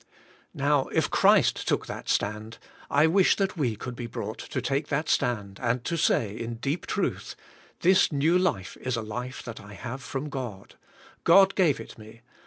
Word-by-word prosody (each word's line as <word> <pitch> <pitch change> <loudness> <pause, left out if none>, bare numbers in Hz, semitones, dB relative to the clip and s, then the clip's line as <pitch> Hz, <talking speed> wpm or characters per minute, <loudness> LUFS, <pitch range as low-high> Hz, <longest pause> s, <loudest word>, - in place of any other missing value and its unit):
Now, - - +2
if - - 0
Christ - - +4
took - - +1
that - - -7
stand, 110 +2 -1 0.3
I 145 +2 +4
wish 185 +3 +4
that 195 -1 -1
we 130 -9 0
could 120 +4 -7
be 120 -1 -5
brought 110 -1 -6
to 130 - -4
take 135 +4 -1
that 150 +2 -1
stand, 100 -5 -1
and 115 +1 0
to 170 - -1
say, 110 -9 +1
in 115 +1 -5
deep 140 +8 -3
truth, - - -2 0.5
''This 185 +1 +4
new 150 +4 +2
life 180 - 0
is 130 -1 -1
a 115 - -3
life 125 +4 -6
that 115 -2 -8
I 105 0 -12
have 125 +5 -6
from 135 +4 -5
God. 120 -9 -6 0.5
God 195 +3 +6
gave 165 - +2
it 115 - -10
me. 110 +1 -13
125 Hz, 185 wpm, -27 LUFS, 110-155 Hz, 0.5 s, God